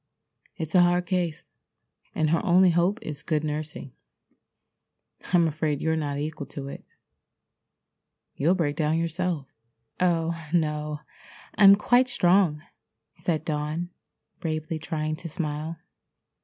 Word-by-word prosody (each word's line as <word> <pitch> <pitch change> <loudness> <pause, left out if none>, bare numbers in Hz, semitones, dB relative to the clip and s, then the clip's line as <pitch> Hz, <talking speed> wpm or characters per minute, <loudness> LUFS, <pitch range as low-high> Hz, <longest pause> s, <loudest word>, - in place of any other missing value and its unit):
"It's 160 -1 -5
a 180 - +7
hard 175 0 +3
case, 175 -4 -2 0.7
and 155 -1 +1
her 165 - +2
only 185 -1 +5
hope 175 +5 +2
is 150 -1 -6
good 155 -2 -1
nursing. 150 -3 -5 1.4
I'm 175 -2 +5
afraid 155 -2 -1
you're 160 +1 0
not 145 -3 -2
equal 150 0 -4
to 140 -1 -7
it. - - -9 1.5
You'll 165 +6 +2
break 150 -5 0
down 155 +1 +1
yourself." 165 -3 -2 0.5
"Oh, 165 -2 +1
no, 150 -2 -1 0.5
I'm 200 -1 +8
quite 245 +5 +3
strong," 175 -8 +3 0.5
said 160 -3 -2
Dawn, 155 +3 -2 0.5
bravely 155 -1 -3
trying 155 -1 -3
to 170 0 -6
smile. 155 0 -4
160 Hz, 120 wpm, -26 LUFS, 150-175 Hz, 1.5 s, I'm